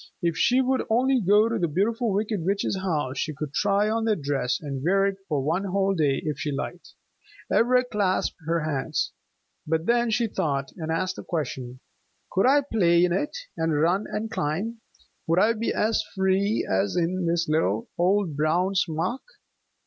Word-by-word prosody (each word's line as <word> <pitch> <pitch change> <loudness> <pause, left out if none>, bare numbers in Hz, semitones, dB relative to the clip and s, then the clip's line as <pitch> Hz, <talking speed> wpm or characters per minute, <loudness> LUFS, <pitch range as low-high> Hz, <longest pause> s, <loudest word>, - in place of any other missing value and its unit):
If 170 -1 +1
she 245 +9 +3
would 260 0 +1
only 255 +3 +3
go 205 +3 +4
to 230 - -1
the 170 - +1
Beautiful 220 - 0
Wicked 205 -2 -1
Witch's 195 +2 0
house, 150 -8 -2
she 155 -2 -2
could 150 -1 -5
try 200 +5 +2
on 225 +1 0
that 210 -9 0
dress, 135 -3 0
and 140 -3 -5
wear 195 +6 +3
it 195 -1 -1
for 145 -4 0
one 170 +7 0
whole 195 +1 +1
day 145 -6 +1
if 150 -2 -2
she 150 - -2
liked. 160 +5 -6 0.6
Ivra 250 +2 +4
clasped 205 -5 0
her 165 0 +1
hands. 150 -3 -2 0.6
But 160 +1 0
then 240 +1 +2
she 230 +2 +1
thought, 145 -10 -2
and 160 -2 -4
asked 185 +3 -1
a - - -7
question. 130 -6 -4 0.5
"Could 195 - +3
I 285 +2 +5
play 180 -10 +3
in 175 - 0
it, 295 - -2 0.2
and 160 -2 0
run 175 +6 +1
and 220 +1 -3
climb? 220 +7 -2 0.5
Would 165 +1 +2
I 215 +5 +4
be 230 +1 -2
as 220 +1 +1
free 195 +3 +1
as 95 +1 0
in 175 +1 0
this 170 0 +1
little 160 +9 0
old 185 -2 +2
brown 170 +6 +1
smock?" 180 +6 -1
185 Hz, 180 wpm, -25 LUFS, 155-215 Hz, 0.6 s, I